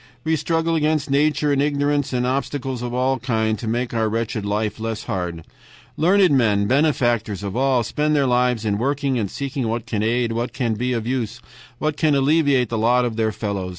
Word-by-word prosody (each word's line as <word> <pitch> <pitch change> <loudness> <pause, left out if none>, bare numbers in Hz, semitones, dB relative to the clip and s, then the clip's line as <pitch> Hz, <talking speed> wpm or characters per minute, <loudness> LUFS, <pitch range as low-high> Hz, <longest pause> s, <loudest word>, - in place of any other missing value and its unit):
We 160 0 +1
struggle 165 +2 0
against 155 -2 0
nature 145 +1 +2
and 140 - +2
ignorance 145 -1 0
and 125 -1 0
obstacles 130 -1 -2
of 120 -1 -4
all 130 +1 0
kinds 110 -3 0
to 115 - -4
make 120 +2 -1
our 110 -1 +1
wretched 115 -1 -2
life 105 +1 -2
less 115 0 -4
hard. 85 -3 -4 0.5
Learned 185 +2 +4
men 105 -5 +2
benefactors 120 - +1
of 100 0 -4
all 130 -1 +2
spend 150 +5 0
their 140 -2 +3
lives 125 -2 +1
in 100 -1 0
working, 140 +1 0
in 105 -4 -1
seeking 135 +2 -4
what 115 +1 -2
can 110 -4 -2
aid, 115 +2 +1
what 115 +2 -3 0.2
be 125 +3 -1
of 115 -2 -2
use, 120 -2 -2 0.4
what 155 +2 -2
can 155 -3 +2
alleviate 140 -3 +3
the 115 - -2
lot 125 +3 +3
of 115 -2 -3
their 110 -1 0
fellows. 100 -3 -3
125 Hz, 195 wpm, -21 LUFS, 110-140 Hz, 0.5 s, Learned